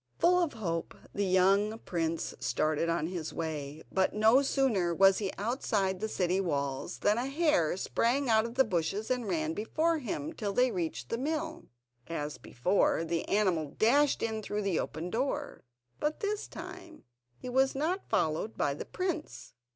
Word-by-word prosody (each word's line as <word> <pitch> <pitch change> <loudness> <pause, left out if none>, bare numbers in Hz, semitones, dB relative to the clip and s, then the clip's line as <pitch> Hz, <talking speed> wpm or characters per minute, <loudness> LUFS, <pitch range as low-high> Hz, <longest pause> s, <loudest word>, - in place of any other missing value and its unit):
Full 360 +1 +4
of 335 -4 0
hope 170 -6 -3 0.2
the 200 -1 0
young 195 +4 +3
prince 165 -5 -2
started 155 +2 0
on 165 -2 0
his 170 -2 -4
way, 155 -2 -4
but 190 +1 +1
no 220 +5 +5
sooner 225 -11 +1
was 195 +1 +5
he 200 -3 -2
outside 205 -4 0
the 220 - -2
city 185 -1 +1
walls 140 -4 -2
than 210 +3 +2
a 250 - -1
hare 275 - +2
sprang 255 +7 +1
out 220 -1 +4
of 235 +1 -6
the 265 - +6
bushes 200 +3 -1
and 250 -3 0
ran 315 +3 0
before 320 +9 0
him, 290 +5 -4
till 205 -8 -3
they 250 +3 +3
reached 160 - -3
the 230 - -2
mill. 315 +3 -3 0.4
As 150 -3 -4
before, 170 +5 +1
the 165 0 -2
animal 180 -8 +1
dashed 280 +6 +3
in 220 -1 -1
through 210 0 -3
the 195 -4 +1
open 170 +3 -4
door, 275 +4 -2 0.4
but 300 +1 -1
this 415 0 -2
time 320 -3 -10 0.3
he - - -9
was 265 +2 +2
not 335 +8 -1
followed 160 +8 0
by 140 - +1
the 140 - -6
prince. 360 -4 -4
210 Hz, 170 wpm, -31 LUFS, 170-270 Hz, 0.4 s, the